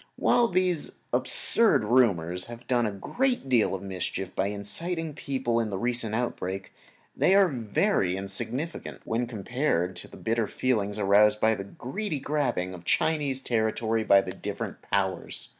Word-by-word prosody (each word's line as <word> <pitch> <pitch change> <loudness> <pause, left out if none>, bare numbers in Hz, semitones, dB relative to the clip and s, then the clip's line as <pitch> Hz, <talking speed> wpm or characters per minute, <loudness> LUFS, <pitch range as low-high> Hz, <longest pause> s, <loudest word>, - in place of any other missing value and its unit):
While 240 -1 +3
these 180 -4 +1
absurd 215 - +5
rumors 95 -7 +2
have 120 0 -11
done 120 -2 +1
a - - -2
great 245 - -2
deal 120 -6 +2
of 95 - -7
mischief 95 0 -4
by 95 - 0
inciting 160 - -2
the - - -10
people 130 -4 -1
in 115 -2 -1
the 100 - -3
recent 120 0 0
outbreak, 95 -5 -4 0.4
they 190 - +3
are 200 -1 +6
very 115 - 0
insignificant 110 +11 -2
when 120 +2 -1
compared 110 - -2
with - - -12
the - - -13
bitter 115 -1 -1
feeling 105 -5 -1
aroused 105 +1 +4
by 110 +1 +3
the 100 -2 -5
greedy 150 - -5
grabbing 130 -11 -2
of 90 -2 -10
Chinese 140 - 0
territory 110 -1 0
by 100 -2 +5
the - - -7
different - - -6
Powers. 95 -3 -2
115 Hz, 160 wpm, -27 LUFS, 100-135 Hz, 0.4 s, are